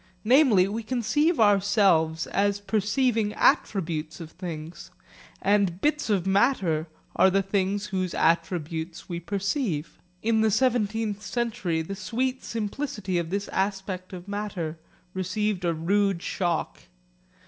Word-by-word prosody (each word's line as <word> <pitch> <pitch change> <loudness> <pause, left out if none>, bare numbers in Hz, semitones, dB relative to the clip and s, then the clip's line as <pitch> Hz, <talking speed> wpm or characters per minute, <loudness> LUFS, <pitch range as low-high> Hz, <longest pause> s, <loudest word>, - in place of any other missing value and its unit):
Namely 235 -6 +5
we 215 +3 -3
conceive 255 +8 +1
ourselves 195 -6 +3
as 200 +1 0
perceiving 215 +1 0
attributes 165 -4 +1
of 160 -2 -8
things, 165 -2 -7 0.5
and 195 -3 +2
bits 300 +1 0
of 195 -4 +1
matter 190 - +2 0.3
are 190 - +5
the 195 +1 +2
things 195 +1 0
whose 185 -2 -1
attributes 165 0 -1
we 170 -2 -4
perceive. 195 - -2 0.2
In 220 0 +2
the 220 - +4
seventeenth 220 -3 +1
century 190 -6 -2
the 195 +5 -6
sweet 250 +7 -2
simplicity 210 -4 -3
of 165 -1 -3
this 200 +2 -2
aspect 190 -1 -2
of 180 0 -9
matter 200 -6 -4 0.3
received 190 +1 -1
a 170 - +2
rude 185 +3 +1
shock. 175 -3 -2
195 Hz, 125 wpm, -26 LUFS, 175-215 Hz, 0.5 s, Namely